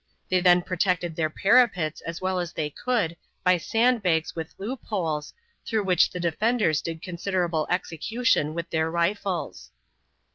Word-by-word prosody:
They 185 - +3
then 175 -1 +5
protected 180 -2 0
their 160 -1 0
parapets 195 -4 +3
as 170 0 -6
well 185 0 -1
as 175 -1 -4
they 150 -1 -3
could 220 - -1 0.3
by 180 0 +4
sand 230 +7 +2
bags 160 -4 0
with 160 -1 -6
loop 235 +6 -5
holes, 160 -8 -2 0.3
through 220 -2 -1
which 180 -3 +3
the 180 - -6
defenders 175 -1 +1
did 165 -1 -6
considerable 175 -3 -1
execution 180 - 0
with 170 0 -5
their 160 0 +1
rifles. 175 - -2
180 Hz, 150 wpm, -26 LUFS, 165-200 Hz, 0.3 s, then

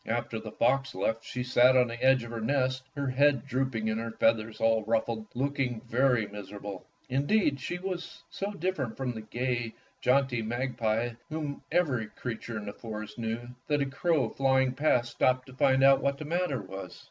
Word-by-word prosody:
After 115 0 -2
the 110 -1 -8
fox 135 +1 +1
left 110 +4 -1
she 125 +2 -4
sat 125 +1 +5
on 125 - +6
the 120 +1 -6
edge 130 -2 +5
of 115 - -8
her 115 -1 -4
nest, 130 +1 +1
her 140 -1 -2
head 140 0 +3
drooping 130 -5 -1
and 110 +1 0
her 115 - -4
feathers 115 -1 +1
all 115 -1 +3
ruffled, 110 0 0
looking 135 -2 -1
very 125 -1 +2
miserable. 100 -1 -8 0.2
Indeed, 140 +3 +2
she 175 +7 -3
was 180 -1 -5
so 200 - -3
different 165 - -2
from 130 -2 -1
the 110 -2 -6
gay, 120 +1 -2 0.3
jaunty 125 -2 +2
mag 120 +4 -2
pie, 115 0 0
whom 155 -2 -4
every 140 -10 +1
creature 115 0 -5
in 105 - -5
the 100 - -5
forest 110 0 -7
knew, 115 +1 -3 0.2
that 145 -1 +2
a - - -1
crow 140 +2 +1
flying 130 -1 +2
past 125 -4 +2
stopped 130 +1 +2
to 130 - -13
find 130 0 +3
out 135 0 +7
what 140 0 +1
the 155 - -6
matter 160 - -1
was. 95 -1 -8
125 Hz, 190 wpm, -29 LUFS, 115-135 Hz, 0.3 s, out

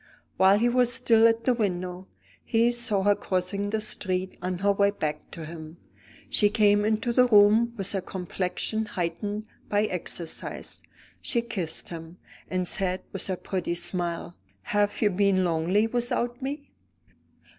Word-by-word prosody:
While 190 +1 +6
he 235 +3 +2
was 245 0 +3
still 230 -2 +4
at 230 0 +1
the 255 - +3
window, 185 -4 -2 0.4
he 230 +1 +3
saw 220 -5 0
her 205 +1 +5
crossing 195 +1 -2
the 220 +1 0
street 190 -3 -2
on 180 0 -2
her 200 +3 +2
way 200 0 +3
back 155 -6 -4
to 165 -2 -8
him. 160 0 -9 0.5
She 205 - +3
came 205 -1 +4
into 220 +2 0
the 250 +1 +5
room 220 +2 +5
with 195 -1 -2
her 195 - -1
complexion 190 +4 -3
heightened 205 +3 -3 0.2
by 205 0 +2
exercise; 175 -3 -5 0.4
she 235 -2 0
kissed 190 -9 -4
him, 165 +1 -8 0.3
and 185 -1 0
said 185 0 -1
with 195 - -2
her 185 -2 -2
pretty 180 -2 -3
smile: 175 -1 -3 0.3
"Have 205 +2 0
you 205 - +4
been 190 0 +2
lonely 175 +5 +2
without 240 +1 -1
me?" 285 +2 -5
200 Hz, 155 wpm, -27 LUFS, 180-220 Hz, 0.5 s, While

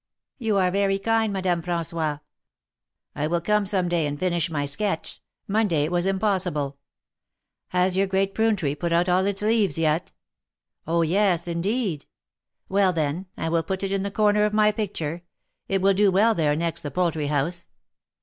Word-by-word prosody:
You 220 -4 0
are 185 -1 +2
very 195 0 +1
kind, 225 +1 +1
Madame 185 -3 0
Fra§nois. 165 -3 -2 0.9
I 150 +1 -1
will 170 +2 0
come 210 +4 +1
some 185 -2 0
day 170 -3 0
and 145 0 -4
finish 175 0 0
my 145 -3 -2
sketch; 165 +4 -2 0.3
Monday 200 -7 +1
it 155 - -2
was 175 +1 +1
impossible. 185 -8 0 0.9
Has 180 0 +1
your 195 +1 +2
great 195 +1 0
prune 225 -1 +2
tree 150 -8 -1
put 170 +3 -3
out 170 +2 +2
all 185 +2 +2
its 200 0 -2
leaves 210 -8 +2
yet? 160 +1 0 0.4
" - - -45
Oh! 170 +1 +2
yes, 180 0 +1
indeed." 175 - -2 0.3
" - - -60
Well, 195 -1 +2
then, 160 +3 -2
I - - -2
will 165 0 +2
put 190 +3 -4
it 195 - -2
in 195 -1 0
the 200 - -2
corner 210 +1 +2
of 210 0 +1
my 215 0 +4
picture; 175 -6 -4 0.5
it 195 -1 0
will 195 0 +5
do 200 +1 +4
well 210 +5 +4
there 150 -6 +1
next 165 +1 -2
the 145 - -5
poultry 160 -1 -1
house. 150 +4 -1
180 Hz, 185 wpm, -24 LUFS, 165-200 Hz, 0.9 s, will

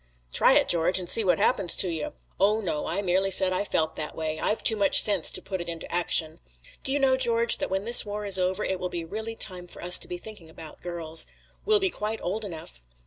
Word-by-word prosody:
"Try - - +4
it, - - +3
George, 170 +2 +1
and 180 -2 -4
see 225 - 0
what 185 - +1
happens 195 -8 +1
to - - +3
you." 160 -3 -5 0.3
"Oh, 210 +3 +2
no! 170 -8 -4
I 200 +4 -3
merely 190 +1 0
said 185 0 +2
I 185 - -1
felt 160 -5 -2
that 150 - -4
way. 155 -1 -4
I've 215 - -1
too 220 - +5
much 200 -2 +5
sense 200 -6 0
to - - -1
put 190 -2 -5
it 170 - -7
into 165 -1 -8
action." 165 -2 0 0.4
"Do 265 - -4
you 285 - +1
know, 270 -2 +2
George, 235 -2 +1
that - - -3
when 190 +1 -2
this 235 +1 +8
war 210 0 -6
is 195 -2 +5
over 185 +3 -1
it 190 -1 -3
will 180 - -4
be 170 -2 -6
really 220 +6 -6
time 180 -5 +1
for - - -12
us 180 0 +4
to - - -6
be 180 - -6
thinking 180 -4 -13
about 160 -1 -12
girls. 165 -2 +1 0.4
We'll 425 0 +4
be 380 -2 0
quite 215 -3 -5
old 210 +5 -3
enough. 160 - -10
185 Hz, 250 wpm, -25 LUFS, 170-215 Hz, 0.4 s, this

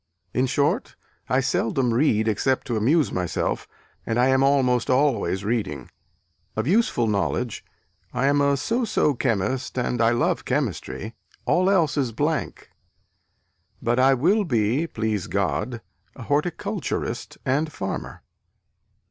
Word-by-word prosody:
In 130 +1 +1
short, 140 +3 0 0.3
I 130 +3 +3
seldom 125 -1 0
read 115 -4 +2
except 130 +5 +1
to 120 - -2
amuse 130 +3 +2
myself, 90 -2 -2 0.4
and 115 - -2
I 125 +2 +4
am 130 0 +3
almost 130 -3 +2
always 125 -8 +1
reading. 100 - -2 0.6
Of - - -1
useful 180 - +2
knowledge, 110 +2 -1 0.5
I 125 +2 0
am 145 +1 +3
a 140 0 +3
so 230 - -1
so 205 -9 +2
chemist, 130 +2 -1
and 120 -1 0
I 115 - +5
love 120 0 +1
chemistry 110 +3 -3 0.3
all 185 +2 +3
else 165 -7 +2
is 130 -5 0
blank 150 +5 -2 1.1
but 120 +2 0
I 135 +1 +5
will 185 - +3
be 125 - +1
(please 110 - -2
God) 100 - -1 0.3
a 130 - -9
horticulturist 150 +7 -2
and 150 +4 0
farmer." 95 -8 -5
130 Hz, 130 wpm, -24 LUFS, 115-145 Hz, 1.1 s, I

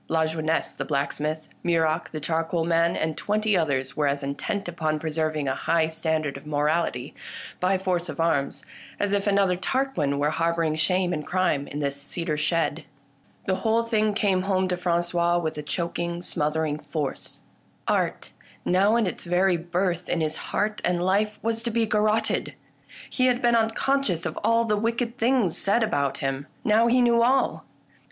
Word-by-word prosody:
Lajeunesse 160 0 0
the - - -4
blacksmith, 150 +2 -2 0.2
Muroc 165 -1 +1
the 155 - -5
charcoal 165 +2 -1
man, 170 0 +2
and 155 0 -1
twenty 210 +2 0
others 135 -6 0
were 150 -1 +1
as 140 0 -1
intent 140 +9 -3
upon 155 -3 -1
preserving 155 -1 -1
a 130 - +1
high 165 +3 +1
standard 160 -2 -1
of - - -13
morality, 150 -3 0 0.5
by 185 +1 +2
force 180 -2 -1
of 155 - -6
arms, 160 -4 0 0.3
as 205 0 0
if 200 0 0
another 195 -2 +3
Tarquin 190 - -1
were 145 +1 +1
harbouring 165 -1 +1
shame 180 +3 +1
and 150 -2 -3
crime 180 -6 +1
in 145 +1 -5
this 140 0 -2
cedar 165 +2 -3
shed. 160 0 0 0.6
The 190 -1 +1
whole 225 0 +2
thing 215 -2 +1
came 195 -4 +2
home 190 -1 +1
to 180 - +1
Frangois 175 0 +1
with 160 -2 -2
a - - -2
choking 170 +2 -3
smothering 150 -1 0
force. 150 -4 -5 0.5
Art, - - 0 0.3
now 195 +5 +3
in 235 -2 +3
its 185 - -4
very 180 +1 +3
birth 175 +1 -2
in 175 - 0
his 155 -1 -1
heart 210 +1 -1
and 175 -1 +1
life, 210 +3 +1
was 225 0 0
to 235 - -2
be 230 0 +1
garrotted. 215 0 +1 0.5
He 255 -1 +1
had 245 -1 +2
been 240 -2 +3
unconscious 225 -4 +1
of - - -3
all 230 0 +3
the 210 -2 +1
wicked 235 +2 -1
things 230 -7 +2
said 215 +4 +2
about 140 -10 0
him: 135 +1 -3 0.2
now 225 +1 +4
he 250 +1 +4
knew 235 -1 +4
all 260 +3 +2
175 Hz, 170 wpm, -25 LUFS, 155-210 Hz, 0.6 s, now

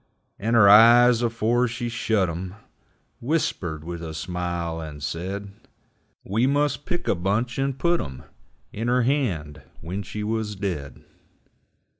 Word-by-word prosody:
And 115 +4 0
her 105 -3 +7
eyes, 120 +3 +7
afore 120 +1 +1
she 120 +1 -4
shut 110 -4 0
'em, 90 +3 -5 0.6
Whispered 110 - -2
with 85 0 -6
a 80 -1 -6
smile 85 0 -3
and 75 -2 -8
said 95 +6 -4 0.7
We 110 +6 +1
must 145 +1 0
pick 175 0 -3
a - - +3
bunch 105 +8 -1
and 135 -1 -1
putt 170 +3 +1
'em 65 -2 -8 0.5
In 115 +3 -3
her 125 +1 +2
hand 90 - -1 0.2
when 95 +4 -5
she 105 +3 -6
wuz 110 -1 -2
dead. 85 -9 -5
105 Hz, 140 wpm, -24 LUFS, 85-120 Hz, 0.7 s, her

